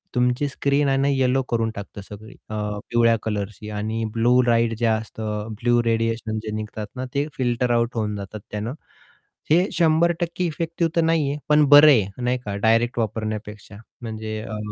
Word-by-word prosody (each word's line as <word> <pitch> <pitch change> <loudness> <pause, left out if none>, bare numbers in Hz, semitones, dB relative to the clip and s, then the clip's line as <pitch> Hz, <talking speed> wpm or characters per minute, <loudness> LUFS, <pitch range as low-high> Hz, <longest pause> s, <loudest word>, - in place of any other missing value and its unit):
तुमची 125 +3 +1
स्क्रीन 140 +1 +1
आणि 135 +1 +2
येलो 130 0 +2
करून 115 -1 0
टाकतं 100 0 -8
सगळी 105 +2 -11
अ, 110 - -4 0.3
पिवळ्या 115 -1 +4
कलरची 105 0 -4
आणि 110 +2 -3
ब्लू 120 +2 +4
लाईट 115 -1 +3
जे 120 - 0
असतं 110 -1 -3
ब्लू 120 0 +3
रेडिएशन 115 -1 -1
जे 110 - -5
निघतात 110 0 -5
ना, 130 +1 -4
ते 140 +2 0
फिल्टर 120 -1 0
आउट 120 0 +1
होऊन 105 -2 -1
जातात 100 +1 -7
त्यानं, 105 +4 -4 0.8
हे 175 +4 +5
100% 170 +2 +1
इफेक्टिव्ह 165 0 -2
तर 170 - +4
नाहीये 155 -3 +1
पण 150 0 +5
बरं 145 +1 +9
आहे 105 -3 +2
नाही 125 +1 +1
का 100 -1 -3
डायरेक्ट 115 +2 +2
वापरण्यापेक्षा 110 -1 -4 0.2
म्हणजे 110 -1 -5
अ, 110 -1 -6
115 Hz, 165 wpm, -23 LUFS, 110-135 Hz, 0.8 s, बरं